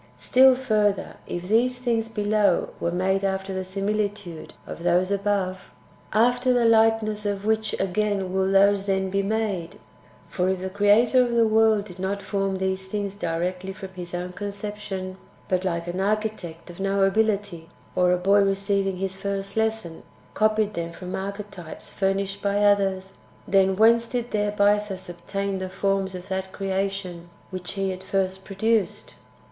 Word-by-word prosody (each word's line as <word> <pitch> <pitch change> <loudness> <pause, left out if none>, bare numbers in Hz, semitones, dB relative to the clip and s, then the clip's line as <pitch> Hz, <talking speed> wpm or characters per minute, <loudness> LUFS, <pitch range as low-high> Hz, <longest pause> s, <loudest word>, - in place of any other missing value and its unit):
5. - - -17
Still 260 0 +6
furtlier, 215 -6 0
if 175 +1 -5
these 240 +4 +2
things 230 -3 -1
[below] 210 -3 +1
were 170 - 0
made 190 +2 0
after 190 0 -1
the 190 0 -2
similitude 200 -2 -3
of - - -8
those 180 +2 +2
[above], 195 -2 -1 0.4
after 245 +4 +3
the 245 -1 +3
likeness 220 -1 +3
of 205 -1 -2
which 220 -1 0
ao 195 - +1
ain 200 -3 0
will 190 0 +1
those 200 0 +4
then 190 -1 0
be 195 +1 +1
made? 200 -5 -2 0.5
For 180 0 0
if 190 -1 0
the 190 0 -4
Creator 210 +6 +4
of 240 -1 0
the 230 -1 +5
world 220 -1 +3
did 180 -3 -11
not 200 +2 -2
form 195 -1 -1
these 190 0 -2
things 200 0 -3
directly 180 0 -3
from 190 0 -8
His 180 -2 -7
own 180 +1 -3
^ 180 - -13
con 205 - -4
ception, 200 -2 -5 0.3
but, 185 0 0
like 170 -2 -1
an 175 +2 -3
architect 200 -5 -2
of 170 - -14
no 195 0 +1
ability, 200 -4 0 0.3
or 180 0 +3
a 180 - +3
boy 195 +3 +4
receiving 195 -1 0
his 190 0 -3
first 195 0 -4
lesson, 220 -7 -1 0.3
copied 215 -1 +2
them 170 0 -4
from 180 +2 -6
archetypes 195 -3 -7
furnished 195 0 -1
by 200 0 +1
others, 195 -2 +1 0.3
then 190 0 +3
whence 230 +3 +5
did 240 0 -3
their 205 -1 0
Bythus 205 -2 +1
obtain 195 +3 -3
the 185 0 -4
forms 195 0 -1
of 180 +1 -8
that 190 0 -3
creation 190 -3 -3 0.2
which 185 -1 -5
He 195 -1 -1
at 185 - -9
first 190 0 -1
produced 215 +2 -1
195 Hz, 170 wpm, -24 LUFS, 190-210 Hz, 0.5 s, Still